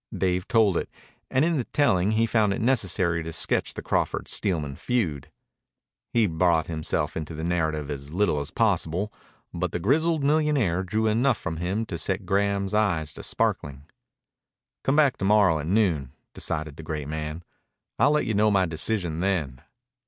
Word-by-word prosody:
Dave 90 -1 0
told 110 -7 +3
it, - - -3 0.4
and 130 +4 +2
in 170 -2 +1
the 130 - 0
telling 105 -8 +2
he 115 +1 +3
found 110 -3 +2
it - - -3
necessary 95 -8 +1
to 80 0 -5
sketch - - -1
the - - -6
Crawford - - -1
Steelman 75 -7 -1
feud. 90 - -2 0.8
He 115 -2 +3
brought 85 -2 +2
himself 80 -1 -2
into 80 0 -5
the 80 - -5
narrative 80 -4 -1
as 70 0 -7
little 90 -4 +1
as 70 - -5
possible, 90 +7 0 0.4
but 90 +1 -2
the 90 - -1
grizzled 155 - +2
millionaire 145 - +2
drew 105 +4 -1
enough 115 +2 +2
from 80 - -5
him 95 +7 -2
to 85 -6 -5
set 95 +4 -1
Graham's 100 +1 0
eye 100 -7 +2
to - - -9
sparkling. 70 -1 -2 1.0
"Come 135 - +2
back 145 -4 +4
to 95 - -2
morrow 100 -6 +4
at 75 - -5
noon," 85 - +1 0.2
decided 75 -2 -4
the - - -7
great 75 -2 -5
man. 80 +2 -5 0.6
"I'll 140 - +5
let 150 0 +2
you 110 - -1
know 105 +1 +3
my 95 -2 +3
decision 85 0 -1
then." 85 -9 -1
90 Hz, 175 wpm, -25 LUFS, 80-110 Hz, 1.0 s, I'll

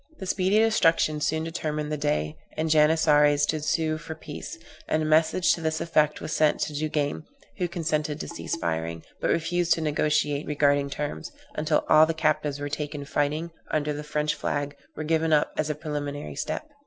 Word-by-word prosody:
This 190 -1 -2
speedy 190 +2 +2
destruction 165 -8 +3
soon 160 +1 0
determined 150 -2 -3
the - - 0
Dey 75 - -1 0.2
and 160 0 0
Janissaries 150 -2 +4
to 155 +1 -1
sue 155 +1 0
for 160 0 -7
peace; 160 - -8 0.3
and 155 0 +1
a - - -1
message 160 +3 +3
to 170 - -5
this 160 0 -1
effect 155 -2 +2
was - - -4
sent 155 -1 +3
to 150 - -1
Duguesne, 150 0 -1 0.4
who 180 - +1
consented 155 -3 -2
to - - -5
cease 170 - -4
firing, 80 - -3 0.2
but - - -1
refused 175 +1 +2
to 165 - -3
negociate 150 -1 0
regarding 145 -1 +2
terms, 140 - -4 0.2
until 155 0 0
all 155 +1 +7
the 165 - -1
captives 150 -2 0
taken 150 -1 -4
fighting 150 +4 -1 0.2
under 150 -1 0
the 150 +1 -5
French 150 0 -1
flag 145 -1 -3 0.2
were 155 - -4
given 160 +1 +1
up 150 -1 +3
as 155 0 -1
a 150 - -1
preliminary 145 -1 -4
step. 145 - -4
155 Hz, 180 wpm, -26 LUFS, 145-160 Hz, 0.4 s, all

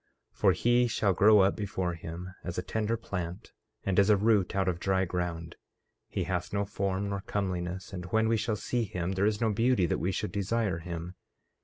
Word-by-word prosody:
14:2 - - -32
For - - +5
he 120 +1 +3
shall 100 -4 +1
grow 105 +1 +6
up 95 +1 +3
before 95 -4 -2
him 85 +2 -7
as 90 0 -5
a 90 - -1
tender 110 +4 -1
plant, 90 -4 -5 0.3
and 95 -1 +2
as 100 +1 +4
a 105 - +6
root 105 -3 +2
out 95 -1 +1
of 90 -2 0
dry 95 0 +1
ground; 85 -2 -4 0.5
he 95 - -2
hath 90 0 -2
no 100 0 0
form 100 0 -2
nor 100 -1 -3
comeliness; 95 -1 -3
and 90 -2 -5
when 110 +5 +2
we 115 - +3
shall 110 0 0
see 120 +3 -1
him 90 -2 -3
there 95 +2 +2
is 105 -1 0
no 115 -2 +2
beauty 115 -2 +3
that - - 0
we 90 - 0
should 105 +2 -3
desire 100 -2 0
him. 85 +1 -6
95 Hz, 210 wpm, -29 LUFS, 90-105 Hz, 0.5 s, grow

